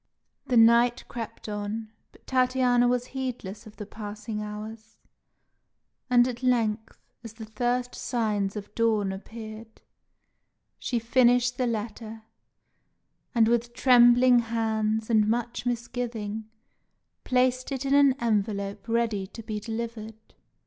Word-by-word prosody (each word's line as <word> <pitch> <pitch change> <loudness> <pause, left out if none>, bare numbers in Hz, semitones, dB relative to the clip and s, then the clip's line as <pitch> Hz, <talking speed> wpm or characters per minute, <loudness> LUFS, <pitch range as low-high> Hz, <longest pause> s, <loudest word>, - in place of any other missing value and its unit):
The 250 - +2
night 235 +1 +5
crept 230 -2 -7
on, 210 +1 -4 0.2
but - - -23
Tatiana 255 -1 +2
was 245 0 +1
heedless 235 -6 -5
of 215 - -14
the 210 - -7
passing 210 +1 -6
hours; 215 +1 -8 1.1
and 245 0 +5
at 245 -1 -5
length, 225 -3 0 0.3
as 230 -2 -9
the 225 -1 -9
first 245 +2 -1
signs 210 -5 -1
of 205 0 -7
dawn 215 -4 +1
appeared, 220 +2 -9 1.0
she 245 - -2
finished 245 +1 +3
the 250 - +1
letter, 220 0 -5 1.1
and, 225 -1 +5
with 240 +1 0
trembling 245 0 +6
hands 220 -1 -1
and 215 -2 +4
much 240 +1 -2
misgiving, 230 -3 -4 0.7
placed 255 +1 +1
it 270 0 -3
in 275 - +1
an 280 -1 +6
envelope 205 -2 -1
ready 225 -4 0
to 225 +3 -10
be 215 -1 -4
delivered. 220 0 -7
230 Hz, 120 wpm, -26 LUFS, 215-245 Hz, 1.1 s, trembling